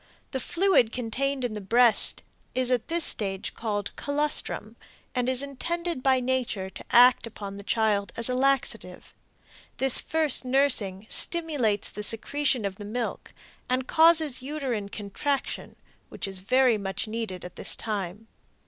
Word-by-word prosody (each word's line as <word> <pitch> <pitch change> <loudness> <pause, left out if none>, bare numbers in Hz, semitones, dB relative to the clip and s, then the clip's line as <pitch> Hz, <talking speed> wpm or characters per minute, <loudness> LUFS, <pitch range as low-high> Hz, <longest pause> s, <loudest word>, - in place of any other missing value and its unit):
The 265 - -2
fluid 340 - +2
contained 255 +3 -2
in 240 -3 -2
the 210 - -5
breast 235 +3 +3 0.3
is 255 0 +1
at 245 -3 0
this 335 0 +2
stage 195 -6 +2
called 205 -3 -4
colostrum, 285 -6 -1 0.4
and 250 0 0
is 260 +1 +4
intended 335 +3 -4
by 260 -1 +3
Nature 245 -7 -2
to - - -10
act 245 0 +6
upon 200 -3 -8
the - - -7
child 210 -2 0
as 230 - +4
a 255 - -1
laxative. 270 +1 -1 0.6
This 265 -1 +3
first 315 -5 0
nursing 250 -7 +1
stimulates 290 - +1
the 210 - -6
secretion 250 +3 +1
of 195 -1 -4
the 205 - -8
milk 225 +3 -4 0.4
and 255 0 0
causes 320 -5 +4
uterine 260 -7 -4
contraction, 220 +8 -4 0.3
which - - -5
is 195 -1 -3
very 245 +3 +3
much 195 +2 -4
needed 215 -5 -5
at 180 - -10
this - - -4
time. 205 -1 -5
245 Hz, 150 wpm, -26 LUFS, 210-275 Hz, 0.6 s, act